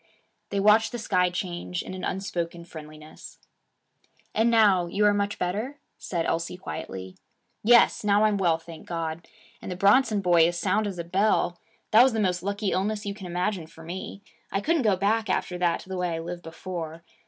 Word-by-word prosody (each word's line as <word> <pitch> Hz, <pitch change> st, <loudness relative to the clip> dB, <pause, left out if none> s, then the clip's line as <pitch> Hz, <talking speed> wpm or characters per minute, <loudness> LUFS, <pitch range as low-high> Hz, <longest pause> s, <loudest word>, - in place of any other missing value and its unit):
They 200 Hz, -, -1 dB
watched 215 Hz, +2 st, +4 dB
the 240 Hz, -, -4 dB
sky 185 Hz, -5 st, +1 dB
change, 180 Hz, 0 st, -4 dB
in -, -, -8 dB
an 185 Hz, -, -7 dB
unspoken 175 Hz, -4 st, -3 dB
friendliness. 155 Hz, -1 st, -11 dB, 1.0 s
'And 225 Hz, +2 st, +3 dB
now, 205 Hz, -6 st, +4 dB
you 205 Hz, +4 st, +1 dB
are 205 Hz, -, +5 dB
much 205 Hz, 0 st, -1 dB
better?' 215 Hz, +11 st, -3 dB, 0.2 s
said 170 Hz, -3 st, -2 dB
Elsie 165 Hz, +2 st, -2 dB
quietly. 95 Hz, -, -7 dB, 0.5 s
'Yes. 235 Hz, +1 st, +5 dB
Now 205 Hz, 0 st, +3 dB
I'm 215 Hz, -1 st, +3 dB
well, 170 Hz, -4 st, +2 dB
thank 165 Hz, -1 st, -12 dB
God! 165 Hz, -1 st, -4 dB, 0.3 s
And -, -, -6 dB
the -, -, -3 dB
Bronson 205 Hz, +4 st, +4 dB
boy 175 Hz, -3 st, +5 dB
as 175 Hz, 0 st, -2 dB
sound 210 Hz, +4 st, +1 dB
as 195 Hz, -3 st, -5 dB
a 170 Hz, -, -3 dB
bell. 180 Hz, 0 st, +1 dB, 0.3 s
That 220 Hz, -, +8 dB
was 255 Hz, -1 st, +5 dB
the 220 Hz, -, -1 dB
most 180 Hz, -4 st, +1 dB
lucky 200 Hz, +1 st, -2 dB
illness 210 Hz, +3 st, -1 dB
you 200 Hz, -, -2 dB
can 195 Hz, -3 st, -9 dB
imagine 180 Hz, 0 st, -2 dB
for 165 Hz, 0 st, -14 dB
me. 185 Hz, +4 st, -7 dB, 0.3 s
I 195 Hz, -, 0 dB
couldn't 325 Hz, +8 st, +1 dB
go 210 Hz, -5 st, +3 dB
back 215 Hz, +3 st, 0 dB
after 180 Hz, -1 st, -1 dB
that 175 Hz, -1 st, +1 dB
to -, -, -15 dB
the 190 Hz, -, -3 dB
way 180 Hz, -2 st, -1 dB
I -, -, -3 dB
lived 175 Hz, +1 st, -6 dB
before. 165 Hz, -1 st, -7 dB
185 Hz, 195 wpm, -26 LUFS, 170-210 Hz, 1.0 s, That